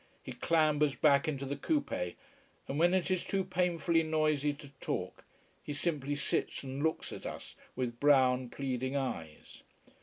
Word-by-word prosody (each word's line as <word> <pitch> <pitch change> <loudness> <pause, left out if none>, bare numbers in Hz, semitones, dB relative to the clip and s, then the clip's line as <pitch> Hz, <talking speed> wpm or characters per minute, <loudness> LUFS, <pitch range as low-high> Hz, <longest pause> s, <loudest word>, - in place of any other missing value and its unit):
He - - -7
clambers 150 -3 +2
back 145 +1 +4
into 140 -3 -2
the 140 +1 -2
coupé, 285 - -1 0.5
and 140 - -2
when 175 +2 +5
it 185 0 0
is 185 -2 +1
too 195 -1 0
painfully 175 -2 +1
noisy 155 -2 +1
to 145 0 -11
talk, - - -4 0.4
he 145 - -5
simply 145 -2 -1
sits 145 - -1
and 135 +1 -5
looks 160 +1 -1
at - - -6
us - - -7 0.2
with 120 -2 -3
brown, 130 -3 +4
pleading 130 0 -2
eyes. 85 - -4
145 Hz, 155 wpm, -32 LUFS, 135-165 Hz, 0.5 s, when